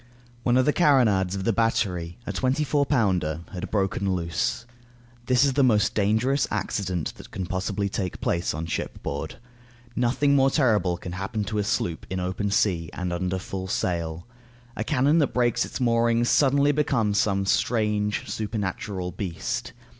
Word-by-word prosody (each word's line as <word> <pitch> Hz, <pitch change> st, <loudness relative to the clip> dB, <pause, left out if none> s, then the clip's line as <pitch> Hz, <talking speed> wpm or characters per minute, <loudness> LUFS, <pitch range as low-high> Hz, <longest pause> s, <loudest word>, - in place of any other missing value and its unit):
One 120 Hz, +1 st, +2 dB
of 130 Hz, -, +4 dB
the 150 Hz, -, +3 dB
carronades 110 Hz, -, +3 dB
of 95 Hz, -, -3 dB
the 115 Hz, -, +1 dB
battery, 90 Hz, -7 st, 0 dB
a -, -, -4 dB
twenty 130 Hz, +3 st, +1 dB
four 145 Hz, -1 st, +1 dB
pounder, 90 Hz, -, +1 dB
had 90 Hz, -, -5 dB
broken 95 Hz, -1 st, 0 dB
loose. 85 Hz, +6 st, -2 dB, 0.6 s
This 130 Hz, +2 st, +4 dB
is 135 Hz, -, +1 dB
the 140 Hz, +1 st, +3 dB
most 110 Hz, -5 st, +3 dB
dangerous 110 Hz, +7 st, +2 dB
accident 95 Hz, -4 st, -2 dB
that -, -, -12 dB
can 95 Hz, -, -4 dB
possibly 95 Hz, +3 st, -2 dB
take 95 Hz, -2 st, -3 dB
place 85 Hz, +1 st, 0 dB
on 80 Hz, +1 st, -3 dB
shipboard. 80 Hz, -, -4 dB, 0.6 s
Nothing 130 Hz, +4 st, +2 dB
more 135 Hz, -1 st, +5 dB
terrible 105 Hz, -, +2 dB
can 90 Hz, -, -7 dB
happen 95 Hz, +4 st, -3 dB
to 105 Hz, 0 st, -2 dB
a -, -, +1 dB
sloop 85 Hz, -4 st, -2 dB
of -, -, -27 dB
was -, -, -4 dB
in -, -, -2 dB
open 95 Hz, +3 st, -2 dB
sea 90 Hz, -6 st, +1 dB
and 90 Hz, 0 st, -3 dB
under 90 Hz, +1 st, -1 dB
full 95 Hz, 0 st, -5 dB
sail. 85 Hz, -3 st, -2 dB, 0.5 s
A 110 Hz, -, -2 dB
cannon 145 Hz, +5 st, +3 dB
that 145 Hz, -, 0 dB
breaks 120 Hz, -2 st, +2 dB
its -, -, -6 dB
moorings 115 Hz, -1 st, +2 dB
suddenly 140 Hz, 0 st, +4 dB
becomes 120 Hz, -8 st, +1 dB
some 100 Hz, -2 st, +1 dB
strange, 105 Hz, -1 st, 0 dB
supernatural 100 Hz, -3 st, -3 dB
beast. 90 Hz, -2 st, -4 dB
105 Hz, 170 wpm, -25 LUFS, 90-125 Hz, 0.6 s, more